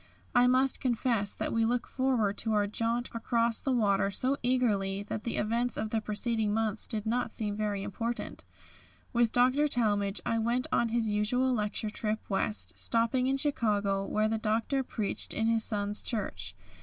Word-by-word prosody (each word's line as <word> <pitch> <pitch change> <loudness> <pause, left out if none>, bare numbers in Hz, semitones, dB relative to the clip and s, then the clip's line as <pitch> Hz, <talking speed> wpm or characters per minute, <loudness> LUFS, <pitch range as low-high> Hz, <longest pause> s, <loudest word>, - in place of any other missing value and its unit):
I 245 0 +5
must 260 +1 +3
confess 235 -5 0
that - - -3
we 230 0 +2
looked 240 +1 0
forward 250 -7 0
to 220 -1 -1
our 205 -1 +2
jaunt 230 +4 -2
across 230 0 +1
the 270 - -1
water 200 -5 +2
so 255 +7 +1
eagerly 205 -6 +1
that 210 +1 -5
the 235 - -2
events 235 +3 0
of 215 - -3
the 225 - 0
preceding 215 0 -1
months 220 -1 0
did 215 -2 -3
not 235 +1 -1
seem 210 -3 -2
very 205 -2 -2
important. 230 +4 -4 0.7
With 235 -2 +3
Dr. 255 +4 +3
Talmage 205 -6 +1
I 230 - 0
went 235 +3 0
on 235 - +2
his 225 -2 0
usual 250 +5 +1
lecture 210 -1 -2
trip 215 0 -2
West, 95 - 0
stopping 230 - +2
in 270 +1 +1
Chicago, 205 -8 0
where 215 +2 0
the 220 0 -1
Doctor 225 +5 0
preached 220 -5 -3
in 220 - 0
his 225 -1 +2
son's 205 -1 +1
church. 95 - -3
225 Hz, 175 wpm, -30 LUFS, 210-245 Hz, 0.7 s, I